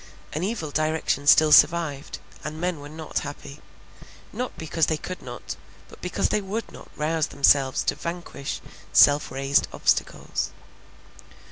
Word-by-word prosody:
An 155 - -2
evil 185 -6 -3
direction 155 -2 0
still 155 0 +7
survived; 150 -2 +4 0.3
and 155 +1 -5
men 175 -2 -1
were 145 0 -9
not 155 0 -4
happy, 145 0 -8 0.7
not 250 0 -4
because 160 0 0
they 155 - 0
could 185 +3 -7
not, - - -7 0.3
but - - -15
because - - -1
they 210 - +1
would 205 +4 -4
not - - -13
rouse 155 +1 0
themselves 140 -1 +3
to - - +1
vanquish 170 -5 -5 0.3
self 145 +1 +6
raised 135 +2 +1
obstacles. - - 0
155 Hz, 140 wpm, -25 LUFS, 145-170 Hz, 0.7 s, still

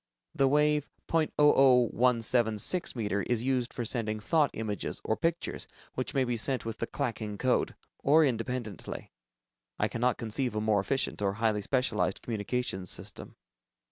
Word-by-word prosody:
The 135 - +3
wave 150 +1 +2 0.2
.00176 125 - +3
meter, 105 -4 -1
is 115 +3 0
used 125 -2 0
for 120 - -4
sending 110 -2 -2
thought 150 +6 +2
images 105 -3 -3
or 110 - 0
pictures 165 +5 -2 0.3
which - - -4
may 135 - +3
be 120 -1 -1
sent 125 +3 0
with 115 -1 -5
the 115 - -2
"clacking" 110 -6 -3
code, 130 +2 +1 0.2
or 155 +3 +5
independently. 115 - -4 0.7
I - - +1
cannot 125 +2 0
conceive 120 +1 -2
a - - +1
more 105 -1 +2
efficient 135 +1 -1
or 100 -1 +1
highly 110 -1 0
specialized 110 -5 0
communications 110 -4 -3
system. - - -6
120 Hz, 140 wpm, -30 LUFS, 110-135 Hz, 0.7 s, or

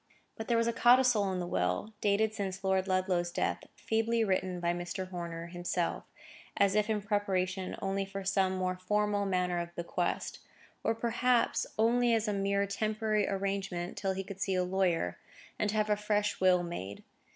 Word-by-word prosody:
But 220 - -6
there 235 - +2
was 230 - +2
a 235 - +1
codicil 240 -4 +5
in 185 - -2
the 175 - -2
will, 90 - -1
dated 210 +1 +2
since 195 -2 -4
Lord 190 0 +1
Ludlow's 185 -2 +1
death—feebly 225 +5 -1
written 185 -3 0
by 170 0 +1
Mr. 175 +2 -4
Horner 170 -2 -5
himself, 175 0 -2 0.5
as 200 -1 +4
if 210 +1 +2
in 210 -2 0
preparation 190 -2 -1
only 195 0 0
for 195 0 -6
some 190 -1 +1
more 185 0 -1
formal 205 +2 0
manner 180 -2 0
of 170 0 -6
bequest: 170 0 -2 0.4
or, 225 - +1
perhaps, 240 +1 +1
only 235 +1 +3
as 220 0 0
a 210 - 0
mere 200 0 +1
temporary 215 +1 0
arrangement 195 -2 -2
till 195 -2 -1
he 190 0 -3
could 195 0 -9
see 190 - +1
a 180 - +2
lawyer, 180 - 0 0.4
and 210 - +1
have 215 0 +1
a - - +5
fresh 210 0 0
will 180 -1 +4
made. 100 - -6
195 Hz, 175 wpm, -31 LUFS, 180-210 Hz, 0.5 s, codicil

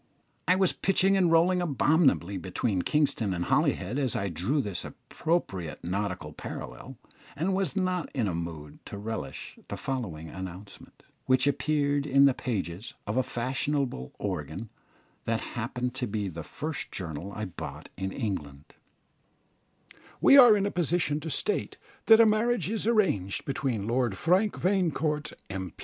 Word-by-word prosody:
I 180 - +5
was 190 -1 +2
pitching 195 0 +2
and 180 -3 +3
rolling 175 +2 +4
abominably 140 - +2
between 95 +2 -1
Kingston 115 -7 +1
and 85 0 -2
Holyhead 110 +10 +1
as 130 -4 0
I 100 -4 -1
drew 95 - 0
this 100 -9 -2
appropriate 95 - -3
nautical 95 -4 -3
parallel, 75 - -8 0.4
and 170 +7 0
was 190 -2 0
not 185 -4 0
in 120 -6 +1
a 90 - -1
mood 80 -3 -6
to - - -7
relish 110 +2 -6
the - - -5
following 100 -13 -4
announcement, 95 +3 -9 0.2
which 130 0 +4
appeared 145 0 +1
in 140 0 +6
the 135 - +5
pages 105 -2 -4
of 105 - -2
a 130 - +4
fashionable 130 - -2
organ, 95 +2 -4 0.5
that 115 0 0
happened 125 +1 -3
to 125 -1 -2
be 100 -2 -2
the 85 -1 -6
first 150 - -5
journal 85 +1 -5
I 110 - -3
bought 90 - -8
in 95 +1 -3
England: 80 - -4 1.6
"We - - +7
are 245 -6 +9
in 200 - 0
a 200 - 0
position 170 -3 0
to 160 - -5
state 420 - 0 0.3
that 225 0 +9
a 230 - +8
marriage 220 0 +2
is 220 -1 -1
arranged 180 - +1
between 130 -7 -1
Lord 120 -3 0
Frank 190 +5 +2
Vanecourt, 160 -6 0 0.2
M. 95 -4 -5
125 Hz, 150 wpm, -28 LUFS, -, 1.6 s, are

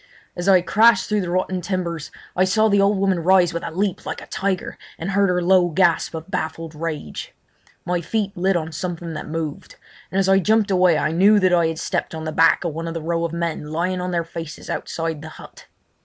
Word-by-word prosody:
As 175 +2 -4
I 185 -2 +6
crashed 200 +3 +4
through 210 -1 +1
the 180 - -4
rotten 185 +1 -1
timbers 170 -4 -3 0.3
I 185 - +3
saw 215 +4 +3
the 200 -1 +4
old 200 +1 +3
woman 190 -2 +1
rise 180 0 +4
with 170 - -4
a - - -3
leap 190 +3 -2
like - - -5
a - - -10
tiger 190 -1 -3 0.2
and 175 +4 -4
heard 200 0 +3
her 180 -1 +1
low 180 0 +4
gasp 170 -1 +1
of 160 +4 -8
baffled 165 -2 -4
rage. 155 - -6 0.5
My 175 -1 -1
feet 200 +3 -2
lit 190 +1 +1
on 160 -1 -4
something 170 -1 -5
that 155 - -6
moved, 155 -1 -5 0.3
and 190 - -3
as 195 -1 +2
I 195 0 +5
jumped 210 +1 +2
away 180 -3 +4
I 155 - 0
knew 200 +5 +5
that 185 -2 +3
I 170 -2 +4
had 160 0 -3
stepped - - -3
on 160 - -6
the 155 - -2
back 165 +1 +4
of 170 -3 -2
one 165 +2 -5
of 165 - -5
the - - -2
row 170 +1 -1
of 170 - -2
men 170 -2 -3
lying 180 +4 -2
on 180 - -3
their 170 -1 0
faces 165 -2 -7
outside 165 -2 -3
the 160 - -8
hut. - - -14
175 Hz, 230 wpm, -21 LUFS, 165-190 Hz, 0.5 s, I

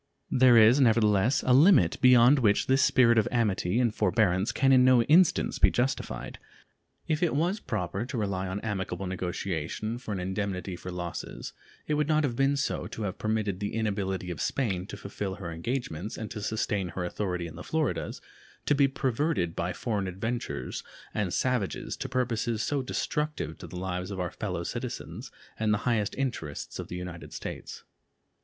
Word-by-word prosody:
There 125 -2 +6
is 115 +5 +7
nevertheless 110 0 +3
a 125 - +4
limit 140 - +5
beyond 125 +2 +7
which 105 -5 +3
this 135 +1 +3
spirit 120 -3 +5
of 110 - +1
amity 110 -4 +1
and 120 -3 +2
forbearance 100 -1 +2
can 135 0 +2
in 130 -1 +6
no 125 -2 +6
instance 160 +7 +3
be - - +6
justified. 130 +2 -2 0.7
If 155 -1 0
it 170 -5 +1
was 175 +8 +1
proper 100 - -3
to 130 - -4
rely 95 -3 -1
on 95 +2 -3
amicable 100 -2 -3
negotiation 95 +4 -3
for 125 - -7
an 100 - -2
indemnity 95 0 -3
for 90 +1 -8
losses, 90 -1 -6 0.3
it 150 - -1
would 150 -1 +1
not 155 0 +3
have 130 -5 -1
been 135 +2 +2
so 140 - -2
to 110 - -6
have 95 -3 -4
permitted 110 -3 -1
the 105 +1 -3
inability 95 -4 -2
of 80 -3 -5
Spain 95 -8 -1
to - - -7
fulfill 100 -1 -5
her 90 -4 -6
engagements 100 - -4
and 110 -2 -6
to 105 - -5
sustain 105 -2 -1
her 90 +1 -4
authority 90 -1 -3
in 80 -1 -8
the 90 - -8
Floridas 145 - -2 0.4
to - - +3
be 140 -1 +4
perverted 135 - -1
by - - -1
foreign 105 -5 -2
adventurers 110 +6 -4 0.3
and 100 -4 -1
savages 125 -4 -1
to - - -5
purposes 115 -3 -1
so 145 -2 0
destructive 150 - -2
to - - -8
the 90 - -8
lives 90 0 -3
of 100 -2 -5
our 90 -2 -2
fellow - - -4
citizens - - -5 0.3
and 110 -1 +1
the 105 - +3
highest 110 -5 +1
interests 120 - -4
of - - -5
the 90 - -6
United 90 -1 -7
States. - - -7
110 Hz, 180 wpm, -28 LUFS, 95-125 Hz, 0.7 s, is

